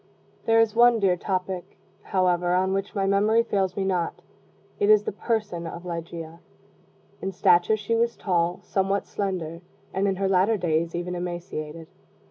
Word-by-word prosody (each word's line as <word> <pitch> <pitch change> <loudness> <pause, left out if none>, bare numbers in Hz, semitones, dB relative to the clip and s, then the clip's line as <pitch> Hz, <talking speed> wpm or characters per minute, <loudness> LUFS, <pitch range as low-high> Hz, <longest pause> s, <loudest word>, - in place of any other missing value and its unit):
There 225 0 +4
is 225 -2 +3
one 240 0 +6
dear 190 -3 +3
topic, 185 0 -3 0.2
however, 180 -2 +1
on 190 +1 +1
which 195 +2 -3
my 195 -1 +1
memory 210 +4 +3
fails 195 -4 -1
me 195 - 0
not. 180 -3 -1 0.6
It 205 - +2
is 215 -1 +6
the - - -2
person 205 -5 -2
of 170 +2 -8
Ligeia. 170 -1 -6 0.8
In 195 - -2
stature 180 +3 +3
she 215 +2 -2
was 235 +1 +1
tall, 175 -2 0
somewhat 195 +1 0
slender, 175 -5 -4 0.3
and, 195 +2 +1
in 195 - +1
her 195 +1 0
latter 195 +4 +3
days, 165 -2 0
even 175 +1 -3
emaciated. 170 -3 -5
190 Hz, 160 wpm, -25 LUFS, 175-200 Hz, 0.8 s, one